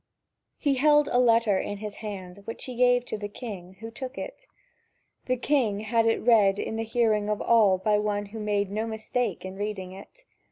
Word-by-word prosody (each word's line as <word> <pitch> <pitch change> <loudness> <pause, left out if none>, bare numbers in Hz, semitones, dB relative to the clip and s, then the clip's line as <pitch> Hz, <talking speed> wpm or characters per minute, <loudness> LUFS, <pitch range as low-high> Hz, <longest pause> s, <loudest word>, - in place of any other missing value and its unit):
He 285 -3 +1
held 295 0 +5
a 245 - +2
letter 230 -5 +4
in 205 - -4
his 210 0 -7
hand 200 -3 -7
which 225 - -6
he 255 - -6
gave 245 0 +3
to 220 - -5
the 205 0 -5
king, 195 -5 -8
who 225 0 -7
took 255 +3 -7
it. - - -8 0.8
The 255 0 0
king 240 -6 +1
had 225 +1 +1
it 225 - +1
read 210 -5 +5
in 220 - -3
the 225 - -2
hearing 220 -2 +1
of 210 - 0
all 210 -5 +4
by 210 +2 +1
one 205 -1 -1
who 225 - -5
made 205 -2 -1
no 215 +2 -2
mistake 220 -2 -3
in 185 +1 -7
reading 200 -3 -4
it. 200 - -13
220 Hz, 200 wpm, -27 LUFS, 205-245 Hz, 0.8 s, held